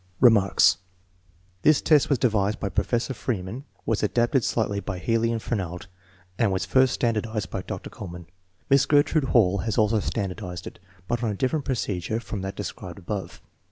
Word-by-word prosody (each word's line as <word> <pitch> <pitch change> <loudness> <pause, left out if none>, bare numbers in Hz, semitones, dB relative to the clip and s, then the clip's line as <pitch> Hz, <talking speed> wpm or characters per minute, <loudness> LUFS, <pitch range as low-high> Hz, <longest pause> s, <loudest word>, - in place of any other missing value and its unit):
Remarks. 105 -9 +5 0.8
This 155 +5 +5
test 150 -3 +4
was 140 - +3
devised 110 -4 +1
by 100 - -2
Professor 120 +7 -1
Freeman, 115 +2 -4 0.2
was 115 -2 0
adapted 120 +4 +2
slightly 100 -3 0
by 95 -2 -5
Healy 115 +4 +1
and 115 - -1
Fernald, 90 -7 -4 0.5
and 105 -4 +3
was 95 0 -1
first 130 +5 +3
standardized 110 -3 -1
by - - -3
Dr. - - -7
Kuhlmann. 85 -4 -8 0.4
Miss 135 0 +4
Gertrude 145 0 +3
Hall 100 -7 +3
has 110 +4 -2
also 110 0 +3
standardized 95 -4 -4
it, 90 - -9 0.3
but 120 -1 -1
on 115 - 0
a 105 - -2
different 135 +7 -1
procedure 110 -5 -2
from 110 -4 -5
that 95 0 -5
described 90 -1 -6
above. 100 +1 -6
110 Hz, 165 wpm, -25 LUFS, 95-120 Hz, 0.8 s, Remarks